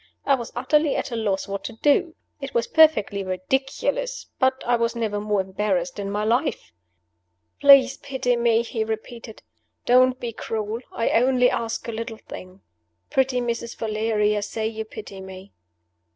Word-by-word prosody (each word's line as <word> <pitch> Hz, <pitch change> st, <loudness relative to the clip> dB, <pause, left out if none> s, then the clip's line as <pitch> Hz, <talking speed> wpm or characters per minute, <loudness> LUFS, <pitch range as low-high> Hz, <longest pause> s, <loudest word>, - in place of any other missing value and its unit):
I 280 Hz, -, +4 dB
was 240 Hz, -4 st, -2 dB
utterly 295 Hz, +4 st, +2 dB
at 280 Hz, -, -3 dB
a -, -, -3 dB
loss 205 Hz, -4 st, -1 dB
what 200 Hz, 0 st, -4 dB
to 230 Hz, -, -5 dB
do. 295 Hz, +7 st, +2 dB, 0.2 s
It 275 Hz, -1 st, -7 dB
was 235 Hz, -, +2 dB
perfectly 260 Hz, -11 st, +4 dB
ridiculous 270 Hz, -, -2 dB
but 260 Hz, 0 st, +1 dB
I 245 Hz, -, +3 dB
was 230 Hz, 0 st, 0 dB
never 215 Hz, -3 st, -2 dB
more 210 Hz, -1 st, +1 dB
embarrassed 190 Hz, -1 st, -2 dB
in 200 Hz, -1 st, -3 dB
my 205 Hz, +1 st, -2 dB
life. 230 Hz, +4 st, 0 dB, 0.9 s
"Please 275 Hz, -2 st, +7 dB
pity 260 Hz, -3 st, -1 dB
me!" 235 Hz, -1 st, +2 dB
he 230 Hz, -1 st, -2 dB
repeated. 220 Hz, +1 st, -7 dB, 0.4 s
"Don't 255 Hz, +1 st, +4 dB
be 235 Hz, -1 st, -5 dB
cruel. 220 Hz, 0 st, -4 dB
I 230 Hz, -, -1 dB
only 250 Hz, +1 st, +3 dB
ask 230 Hz, 0 st, -3 dB
a -, -, -2 dB
little 225 Hz, 0 st, -5 dB
thing. 185 Hz, -2 st, -11 dB, 0.5 s
Pretty 260 Hz, -1 st, +1 dB
Mrs. 235 Hz, 0 st, -3 dB
Valeria, 215 Hz, -1 st, 0 dB
say 220 Hz, +2 st, -3 dB
you 220 Hz, 0 st, -5 dB
pity 205 Hz, -3 st, -9 dB
me!" 190 Hz, +1 st, -11 dB
230 Hz, 160 wpm, -23 LUFS, 210-255 Hz, 0.9 s, Please